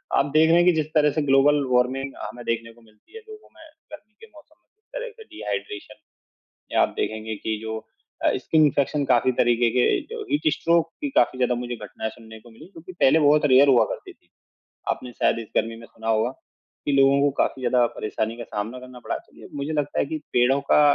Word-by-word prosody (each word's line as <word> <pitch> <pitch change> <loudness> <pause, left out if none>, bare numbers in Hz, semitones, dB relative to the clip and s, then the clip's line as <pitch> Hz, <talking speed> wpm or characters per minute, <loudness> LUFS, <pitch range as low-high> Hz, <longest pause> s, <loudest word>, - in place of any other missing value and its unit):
आप 140 - +3
देख 155 +1 +5
रहे 165 - +5
हैं 175 - +4
कि 180 - +6
जिस 155 -2 0
तरह 150 -1 +4
से 155 - -1
ग्लोबल 145 +1 +4
वार्मिंग 130 +2 0
हमें 120 - -7
देखने 115 0 -2
को 120 - -22
मिलती 110 - -26
है। - - -7
लोगों 430 0 -13
में 325 - -15 0.3
गर्मी 215 -8 -13
के 225 - -13
मौसम 305 +6 -19
में - - -50
किस 435 +1 -54
तरह - - -5
से 445 - -11
डिहाइड्रेशन 105 - -6 0.8
या - - +3
आप - - +3
देखेंगे 110 0 -3
कि 110 +1 -3
जो 110 0 -4 0.5
अ, - - +4
स्किन 160 -1 +2
इन्फेक्शन 145 0 +1
काफ़ी 125 0 +3
तरीके 120 0 +3
के 125 - +2 0.3
जो 460 - -5
हीट 295 - +1
स्ट्रोक 165 -1 +1
की 290 - -1
काफ़ी 130 - +2
ज़्यादा 125 -1 +1
मुझे 120 0 -4
घटनाएँ 105 +1 -6
सुनने 110 -1 -13
को 120 - -17
मिलीं 150 +9 -15
जो 165 - -11
कि 185 - -10
पहले 160 -3 +4
बहुत 150 +1 +4
रेयर 135 +2 +7
हुआ 125 -3 +5
करती - - -7
थीं। - - -36 0.6
आपने 125 - -6
शायद - - +1
इस 115 - -8
गर्मी 115 0 0
में 115 - -12
सुना 110 0 -10
होगा 110 +2 +2 0.6
कि - - 0
लोगों 135 0 +4
को 145 - +4
काफ़ी 135 - -4
ज़्यादा 125 -1 +3
परेशानी 110 +2 -3
का 120 - -6
सामना 110 +3 -5
करना 125 -1 -12
पड़ा। - - -4
तो - - -19
मैं - - -11
मुझे 145 +3 -3
लगता 145 -1 -1
है - - +2
कि 155 +3 -4 0.2
पेड़ों 125 +3 +3
का - - +6
130 Hz, 230 wpm, -23 LUFS, 115-155 Hz, 0.8 s, रेयर